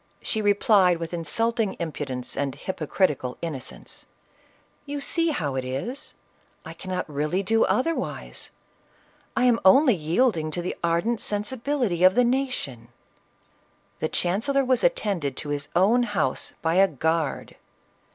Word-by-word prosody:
She 220 - 0
replied 200 -3 +4
with 165 +1 -6
insulting 215 +6 0
impudence 140 -6 -4
and 140 -2 -2
hypocritical 150 -5 -1
innocence, 155 -6 -6 0.8
"You 285 0 -3
see 330 +4 +1
how 155 - -1
it 130 -1 -2
is; 135 - -4 0.5
I - - -8 0.3
really 150 +6 -1
cannot - - -15
do 225 +3 +3
otherwise; 330 +6 -2 0.9
I 255 - +3
am 245 -2 +4
only 255 +8 +6
yielding 165 0 +1
to 175 +3 -3
the 180 - -3
ardent 170 +7 +1
sensibility 220 -2 -1
of 185 0 +7
the 250 - +5
nation 240 - -2 0.6
!" - - -38
The 155 - -1
chancellor 245 +10 +1
was 255 0 +2
attended 195 - 0
to 150 - -5
his 145 0 -3
own 205 +8 +4
house 240 +6 -1
by 165 +2 +2
a 195 +1 +6
guard 160 -1 -1
190 Hz, 135 wpm, -25 LUFS, 155-240 Hz, 0.9 s, of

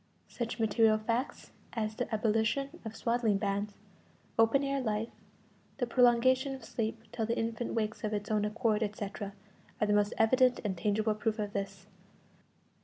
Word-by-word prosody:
Such 235 0 -4
material 220 0 +4
facts 230 +4 -2 0.2
as 220 -2 -1
the 245 +3 -4
abolition 225 +8 0
of 220 -1 -6
swaddling 230 -3 +1
bands, 200 0 -2 0.6
open 225 +5 +5
air 275 0 0
life, 220 -1 -1 0.7
the 255 - 0
prolongation 255 +3 +4
of 260 -4 -11
sleep 225 0 -3
till 225 -2 -2
the 230 - 0
infant 230 +1 -2
wakes 220 0 -2
of 215 - -1
its 210 +1 -3
own 210 -1 +2
accord, 215 0 +1
etc., 205 -1 -4 0.5
are 215 - +3
the 210 - +2
most 205 0 +2
evident 250 +3 +4
and 200 -3 -1
tangible 215 +4 +1
proof 215 +1 -1
of 210 -1 -3
this. 200 0 -4
220 Hz, 160 wpm, -31 LUFS, 210-240 Hz, 0.7 s, open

